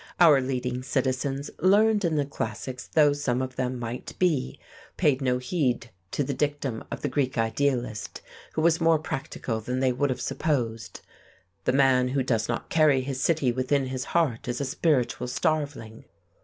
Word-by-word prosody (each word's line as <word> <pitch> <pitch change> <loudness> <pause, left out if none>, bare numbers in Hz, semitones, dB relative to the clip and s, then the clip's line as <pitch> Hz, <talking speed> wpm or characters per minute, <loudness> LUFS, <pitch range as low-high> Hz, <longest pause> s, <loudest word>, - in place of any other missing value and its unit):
Our 155 -6 +7
leading 125 -1 -2
citizens, 135 +2 -1
learned 210 +3 +4
in 165 -3 +1
the 145 -2 +1
classics 125 -1 -5
though 150 -2 +4
some 135 -4 -1
of 130 -1 -4
them 130 0 -2
might 120 0 -6
be, 155 - 0 0.4
paid 140 -2 +2
no 125 -2 +1
heed 125 -4 -1 0.2
to 145 - -1
the 140 - -2
dictum 140 -4 -2
of - - -6
the - - +1
Greek 130 -1 -1
idealist, 115 -1 -1 0.3
who 155 - -1
was 165 0 +3
more 165 -1 +5
practical 135 -6 -4
than 125 +3 -3
they 130 -1 +2
would 140 +3 0
have 130 - -2
supposed. 115 -8 -2 0.6
"The 125 - +2
man 130 -2 +4
who 135 +1 0
does 115 -3 0
not 115 - -2
carry 150 -4 +4
his 130 0 -4
city 155 -7 +2
within 130 +3 0
his 130 -1 -4
heart 150 -11 0
is 120 - -2
a 140 - -1
spiritual 130 -3 0
starveling." 140 -6 -2
130 Hz, 170 wpm, -26 LUFS, 125-145 Hz, 0.6 s, Our